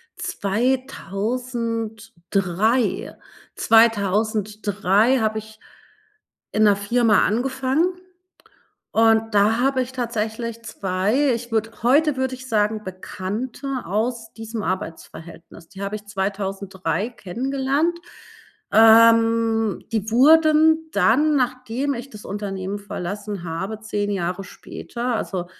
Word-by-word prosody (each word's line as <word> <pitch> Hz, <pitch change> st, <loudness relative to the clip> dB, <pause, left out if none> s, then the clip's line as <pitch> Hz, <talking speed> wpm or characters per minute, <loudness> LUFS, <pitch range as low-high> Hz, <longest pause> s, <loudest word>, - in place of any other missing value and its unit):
2003 225 Hz, -2 st, -2 dB, 0.4 s
2003 215 Hz, +1 st, +2 dB
habe 220 Hz, 0 st, 0 dB
ich 220 Hz, 0 st, -14 dB, 0.9 s
in 215 Hz, -, +2 dB
'ner 205 Hz, -1 st, +5 dB
Firma 215 Hz, +1 st, +2 dB
angefangen 265 Hz, -, 0 dB, 1.0 s
und 225 Hz, 0 st, +3 dB
da 215 Hz, +4 st, +3 dB
habe 260 Hz, 0 st, +2 dB
ich 255 Hz, +1 st, -7 dB
tatsächlich 230 Hz, -1 st, -3 dB
2, 210 Hz, +8 st, 0 dB
ich 235 Hz, 0 st, -5 dB
würde 225 Hz, 0 st, 0 dB
heute 290 Hz, +3 st, +4 dB
würde 260 Hz, 0 st, -1 dB
ich 255 Hz, 0 st, -10 dB
sagen, 215 Hz, 0 st, +1 dB
Bekannte 215 Hz, +8 st, -5 dB
aus 225 Hz, +4 st, -2 dB
diesem 225 Hz, -1 st, -6 dB
Arbeitsverhältnis. 170 Hz, -3 st, -7 dB
Die 195 Hz, -, -12 dB
habe 200 Hz, +1 st, -3 dB
ich 210 Hz, 0 st, -12 dB
2003 195 Hz, 0 st, -3 dB
kennengelernt. 270 Hz, -, -1 dB, 0.8 s
Ähm, 225 Hz, -1 st, +5 dB
die 220 Hz, -1 st, -1 dB
wurden 315 Hz, +4 st, +5 dB
dann, 295 Hz, +6 st, +3 dB
nachdem 255 Hz, +2 st, -1 dB
ich 245 Hz, +3 st, -8 dB
das 210 Hz, -1 st, -12 dB
Unternehmen 195 Hz, -1 st, -4 dB
verlassen 200 Hz, -1 st, -5 dB
habe, 190 Hz, +6 st, -4 dB
10 205 Hz, -2 st, -2 dB
Jahre 180 Hz, 0 st, -2 dB
später, 240 Hz, +6 st, -5 dB
also 180 Hz, -4 st, -3 dB
225 Hz, 100 wpm, -22 LUFS, 200-250 Hz, 1.0 s, ner